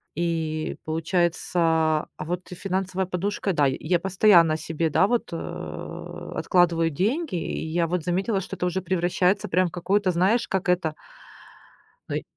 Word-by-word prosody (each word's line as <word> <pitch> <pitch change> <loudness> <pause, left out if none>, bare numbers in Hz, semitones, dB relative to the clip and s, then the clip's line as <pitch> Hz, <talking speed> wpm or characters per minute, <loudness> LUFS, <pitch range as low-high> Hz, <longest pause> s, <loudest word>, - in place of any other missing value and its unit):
И 160 -2 -2
получается. 170 +2 0
А, 160 -2 +2
вот 180 +3 -4
и 180 - -6
финансовая 190 0 -2
подушка, 195 +2 -2
да. 145 -4 +3
И 130 - -1
я 180 - +4
постоянно 180 -4 +4
себе, 160 0 -1
да, 185 +5 +3
вот, 240 +2 0
э, 165 - -7
откладываю 170 -3 +2
деньги. 220 - -1
И 165 -1 -3
я 165 +1 0
вот 175 -1 -1
заметила, 190 +4 0
что 195 +1 -6
это - - -1
уже 180 +1 -1
превращается 185 +3 +1
прям 185 0 +2
в - - -22
какое-то, 190 +2 +1
знаешь, 190 +7 +2
как 190 -1 -1
это? 175 -3 +1 1.1
Но - - -2
и - - -2
180 Hz, 160 wpm, -25 LUFS, 165-190 Hz, 1.1 s, я